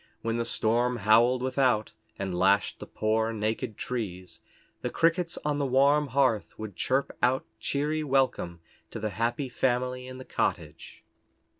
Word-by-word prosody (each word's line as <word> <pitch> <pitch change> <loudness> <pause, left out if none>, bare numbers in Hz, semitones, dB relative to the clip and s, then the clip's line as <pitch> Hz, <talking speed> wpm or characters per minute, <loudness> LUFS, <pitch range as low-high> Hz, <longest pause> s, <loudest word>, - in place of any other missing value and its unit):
When 115 0 -1
the 115 - -1
storm 120 +3 +1
howled 120 +4 +4
without, 130 -4 +1 0.3
and 95 -2 -3
lashed 95 +3 +2
the - - -8
poor, 110 +1 0
naked 110 -1 -2
trees, 95 -7 -5 0.4
the - - -2
crickets 170 +1 +1
on 150 -1 0
the 140 - +1
warm 140 +3 +4
hearth 130 -4 +1
would 110 -3 -7
chirp 135 +2 0
out 125 +2 +2
cheery 150 +2 -1
welcome 130 - 0 0.3
to - - -6
the 105 0 -2
happy 120 +7 -1
family 125 0 -1
in 130 0 -8
the 130 - -9
cottage. - - -3
125 Hz, 150 wpm, -28 LUFS, 110-135 Hz, 0.4 s, howled